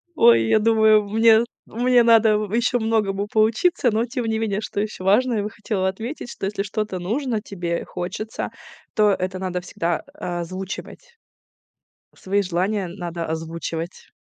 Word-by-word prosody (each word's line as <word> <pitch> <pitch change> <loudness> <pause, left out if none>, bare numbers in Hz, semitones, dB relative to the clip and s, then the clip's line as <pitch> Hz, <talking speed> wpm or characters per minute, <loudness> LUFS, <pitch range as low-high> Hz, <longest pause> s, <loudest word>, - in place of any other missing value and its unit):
Ой, 115 - +6
я 215 - +4
думаю, 220 -1 +4
мне 225 +1 +5 0.2
мне 245 +1 +3
надо, 225 -2 +5
в 210 -1 -4
еще 240 +1 +2
многому 210 -3 0
поучиться. 225 +8 +2
Но, 220 +2 +1
тем 245 0 -4
не 220 0 0
менее, 215 -2 -1
что 200 - -4
еще 210 -2 -3
важное, 225 +5 +3
я 205 - 0
бы 210 - -3
хотела 210 -3 -2
отметить, 230 +8 -5
что - - -5
если 200 0 -2
что-то 210 -2 -3
нужно 225 +5 -2
тебе, 175 -5 -3
хочется, 185 +5 -5 0.4
то 210 -2 +4
это 185 -1 -2
надо 180 -1 -3
всегда 175 -1 -2
озвучивать. 185 - -6 1.0
Свои 200 +2 0
желания 190 +2 -1
надо 170 -2 -5
озвучивать. 165 +1 -5
210 Hz, 150 wpm, -22 LUFS, 185-225 Hz, 1.0 s, Ой